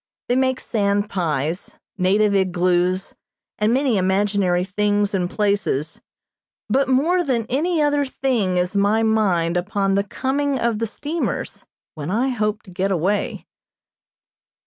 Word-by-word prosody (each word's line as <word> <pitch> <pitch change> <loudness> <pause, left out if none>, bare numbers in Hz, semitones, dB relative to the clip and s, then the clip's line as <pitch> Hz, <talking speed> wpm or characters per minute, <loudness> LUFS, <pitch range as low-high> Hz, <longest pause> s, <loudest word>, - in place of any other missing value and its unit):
They 245 - +3
make 260 0 +1
sand 205 -1 0
pies, 165 -1 -2 0.2
native 200 +2 +2
igloos, 185 -1 +1 0.5
and 210 +1 +2
many 260 -3 +2
imaginary 190 -1 +1
things 205 +1 0
and 180 -2 0
places, 200 -9 -1 0.7
but 270 0 +1
more 330 +8 +2
than 245 -7 0
any 310 +4 +1
other 290 -1 +2
thing 245 -9 -1
is 180 +2 -1
my 205 +3 +2
mind 185 -6 +2
upon 195 +1 0
the 200 +1 +2
coming 275 +6 -1
of 235 -3 0
the 230 - -1
steamers, 300 +9 -4 0.3
when 150 0 -6
I 235 +7 +1
hope 210 -4 -1
to 190 - -14
get 190 +2 -1
away. 190 +3 -1
205 Hz, 135 wpm, -21 LUFS, 185-250 Hz, 0.7 s, They